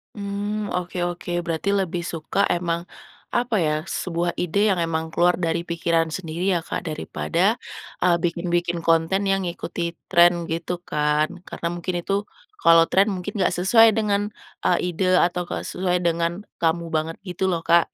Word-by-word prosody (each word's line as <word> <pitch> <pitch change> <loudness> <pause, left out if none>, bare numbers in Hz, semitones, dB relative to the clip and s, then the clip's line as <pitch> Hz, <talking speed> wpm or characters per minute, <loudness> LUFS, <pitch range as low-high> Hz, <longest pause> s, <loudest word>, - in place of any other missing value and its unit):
Mmm, 205 +1 -3
oke 180 0 -3
oke, 175 0 -5 0.2
berarti 165 +4 -1
lebih 185 -3 0
suka 165 +4 -1
emang 170 -1 0 0.5
apa 240 -2 0
ya, 150 - +2
sebuah 170 -1 -2
ide 180 +3 -1 0.2
yang 175 - -1
emang 160 -1 -1
keluar 175 +1 +3
dari 170 -1 0
pikiran 165 -1 0
sendiri 170 +2 -2
ya, 180 - +2
Kak, - - -3
daripada, 170 +5 0 0.5
eee, 175 -1 +4
bikin-bikin 175 0 -1
konten 165 +4 +2
yang 195 -1 +1
ngikutin 170 0 -4 0.2
trend 175 -1 +4
gitu 170 +2 -3
kan. 150 -1 +1 0.2
Karena 170 - -4
mungkin, 175 +1 -4
itu 200 +3 -1 0.3
kalau 165 - +6
trend 195 +2 +4
mungkin 195 +3 -5
gak - - +2
sesuai 220 +5 +5
dengan 205 -1 0 0.3
a 175 - +3
ide 185 +1 +1
atau 180 0 +2
gak - - -4
sesuai 180 -1 -1
dengan 170 +2 0 0.2
kamu 165 0 0
banget 160 0 -1
gitu 190 -1 -2
loh, 170 -3 0
Kak, 170 -1 +4
175 Hz, 160 wpm, -23 LUFS, 170-190 Hz, 0.5 s, kalau